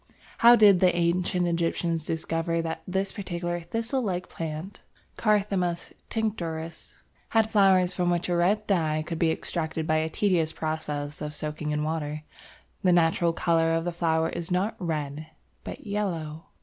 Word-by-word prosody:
How 235 Hz, +1 st, +9 dB
did 205 Hz, -5 st, +6 dB
the 180 Hz, -1 st, +4 dB
ancient 175 Hz, +1 st, +1 dB
Egyptians 170 Hz, -1 st, 0 dB
discover 165 Hz, +1 st, -1 dB
that 165 Hz, 0 st, -4 dB
this 190 Hz, +1 st, -1 dB
particular 175 Hz, -3 st, -3 dB
thistle 225 Hz, +9 st, -2 dB
like 180 Hz, -5 st, -2 dB
plant 165 Hz, +4 st, -6 dB, 0.3 s
(Carthamus 195 Hz, -5 st, 0 dB, 0.2 s
tinctorius) 170 Hz, -7 st, -4 dB, 0.3 s
had 220 Hz, -1 st, +2 dB
flowers 190 Hz, -3 st, +4 dB
from 180 Hz, -1 st, 0 dB
which 175 Hz, 0 st, 0 dB
a 175 Hz, -, 0 dB
red 195 Hz, +5 st, +2 dB
dye 155 Hz, -5 st, +1 dB
could 165 Hz, -1 st, -4 dB
be 165 Hz, -, +3 dB
extracted 160 Hz, -1 st, -3 dB
by 155 Hz, 0 st, +2 dB
a 160 Hz, 0 st, 0 dB
tedious 165 Hz, -4 st, +1 dB
process 150 Hz, -2 st, -4 dB
of 150 Hz, 0 st, -4 dB
soaking 150 Hz, 0 st, -4 dB
in 150 Hz, 0 st, 0 dB
water? 155 Hz, -1 st, -3 dB, 0.6 s
The 185 Hz, -, +3 dB
natural 170 Hz, 0 st, +3 dB
colour 165 Hz, -1 st, +2 dB
of 165 Hz, +1 st, -1 dB
the 175 Hz, -, -1 dB
flowers 165 Hz, -1 st, 0 dB
is 170 Hz, -1 st, -4 dB
not 190 Hz, +5 st, 0 dB
red 155 Hz, -3 st, -3 dB, 0.4 s
but -, -, -8 dB
yellow. 170 Hz, -7 st, -3 dB
170 Hz, 155 wpm, -27 LUFS, 160-185 Hz, 0.6 s, How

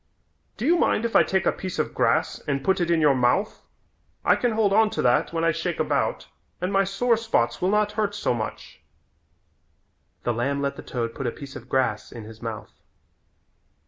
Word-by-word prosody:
Do 220 Hz, -, -3 dB
you 340 Hz, +4 st, +4 dB
mind 230 Hz, -, +2 dB
if 230 Hz, -, -3 dB
I -, -, +8 dB
take 190 Hz, -1 st, 0 dB
a -, -, +4 dB
piece 185 Hz, -2 st, -6 dB
of -, -, -1 dB
grass -, -, +1 dB
and 140 Hz, -1 st, -1 dB
put 190 Hz, +2 st, +2 dB
it 170 Hz, -, 0 dB
in 170 Hz, -2 st, +3 dB
your 150 Hz, -2 st, +5 dB
mouth? 130 Hz, -, +1 dB, 0.6 s
I -, -, +5 dB
can 245 Hz, -2 st, 0 dB
hold 215 Hz, -3 st, +2 dB
on 220 Hz, +1 st, +5 dB
to -, -, -2 dB
that 125 Hz, 0 st, +2 dB
when 165 Hz, 0 st, -1 dB
I 165 Hz, -, +4 dB
shake 165 Hz, +1 st, -3 dB
about -, -, 0 dB, 0.3 s
and 180 Hz, +3 st, -2 dB
my 195 Hz, 0 st, +4 dB
sore 215 Hz, +5 st, +1 dB
spots 220 Hz, -, 0 dB
will 180 Hz, -, +2 dB
not 210 Hz, 0 st, +2 dB
hurt 210 Hz, -1 st, -1 dB
so -, -, 0 dB
much." 110 Hz, -2 st, -6 dB, 1.4 s
The 120 Hz, -, 0 dB
lamb 140 Hz, +5 st, -1 dB
let 140 Hz, 0 st, -1 dB
the -, -, -8 dB
toad 115 Hz, -2 st, -4 dB
put 135 Hz, -, -4 dB
a -, -, 0 dB
piece 140 Hz, +1 st, -10 dB
of -, -, -10 dB
grass 125 Hz, -5 st, 0 dB
in 115 Hz, -, -8 dB
his 110 Hz, +1 st, -12 dB
mouth. 115 Hz, -2 st, -7 dB
170 Hz, 210 wpm, -25 LUFS, 125-210 Hz, 1.4 s, I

